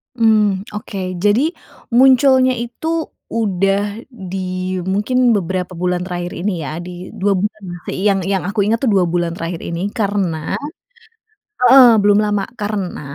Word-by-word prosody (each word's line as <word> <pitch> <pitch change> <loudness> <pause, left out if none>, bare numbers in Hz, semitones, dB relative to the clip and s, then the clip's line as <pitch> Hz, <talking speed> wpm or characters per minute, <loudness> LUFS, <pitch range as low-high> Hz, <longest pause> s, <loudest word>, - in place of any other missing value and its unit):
Mhm. 210 -4 +3
Okey, 190 -4 -5
jadi 225 - +2 0.4
munculnya 260 +1 +5
itu 240 +7 -6 0.4
udah 200 0 0
di 195 -7 -7 0.5
mungkin 235 +5 +2
beberapa 185 -1 -2
bulan 180 +1 -1
terakhir 175 -1 -4
ini 200 +3 -1
ya 155 +3 -5
di 180 +1 -8
2 200 +1 0
bulan 210 +3 -2
lah, 175 0 -7
sei - - -4
yang 195 -1 +2
yang 195 0 -1
aku 205 0 0
inget 220 +3 +1
tuh 270 - -1
2 185 - +4
bulan 170 0 -1
terakhir 165 0 -4
ini, 175 +5 -4
karena 195 -8 -1 1.1
heeh 260 -2 +9
belum 205 0 +4
lama 205 -2 0
karena 205 -7 -4
200 Hz, 145 wpm, -18 LUFS, 180-220 Hz, 1.1 s, heeh